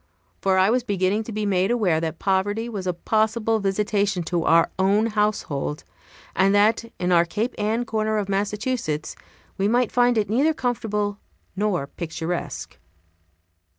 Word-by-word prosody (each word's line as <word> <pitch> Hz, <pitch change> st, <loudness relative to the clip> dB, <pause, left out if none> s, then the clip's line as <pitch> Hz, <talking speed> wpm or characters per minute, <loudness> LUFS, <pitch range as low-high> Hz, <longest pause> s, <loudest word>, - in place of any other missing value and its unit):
For 190 Hz, -1 st, +2 dB
I 190 Hz, +3 st, +4 dB
was 250 Hz, 0 st, +1 dB
beginning 200 Hz, 0 st, 0 dB
to 230 Hz, -, -6 dB
be 215 Hz, 0 st, -2 dB
made 190 Hz, -1 st, +1 dB
aware 195 Hz, -10 st, +2 dB
that 160 Hz, 0 st, -3 dB
poverty 205 Hz, +5 st, 0 dB
was 200 Hz, -5 st, -5 dB
a 180 Hz, -, +1 dB
possible 220 Hz, +4 st, +1 dB
visitation 200 Hz, -1 st, 0 dB
to 170 Hz, 0 st, -1 dB
our 165 Hz, 0 st, +4 dB
own 200 Hz, +3 st, +3 dB
household; 210 Hz, -10 st, -1 dB, 0.5 s
and 195 Hz, +1 st, +3 dB
that, 215 Hz, +3 st, +3 dB
in 180 Hz, 0 st, -1 dB
our 170 Hz, -1 st, +6 dB
Cape 210 Hz, +8 st, -2 dB
Ann 220 Hz, +3 st, 0 dB
corner 220 Hz, -1 st, -1 dB
of 205 Hz, -2 st, -1 dB
Massachusetts, 205 Hz, -, -2 dB, 0.4 s
we 195 Hz, -, +2 dB
might 240 Hz, +1 st, +2 dB
find 245 Hz, -1 st, +3 dB
it 210 Hz, -1 st, +1 dB
neither 280 Hz, +9 st, +2 dB
comfortable 210 Hz, -6 st, -2 dB, 0.4 s
nor 195 Hz, -7 st, 0 dB
picturesque. 165 Hz, +3 st, -5 dB
205 Hz, 150 wpm, -23 LUFS, 185-220 Hz, 0.5 s, our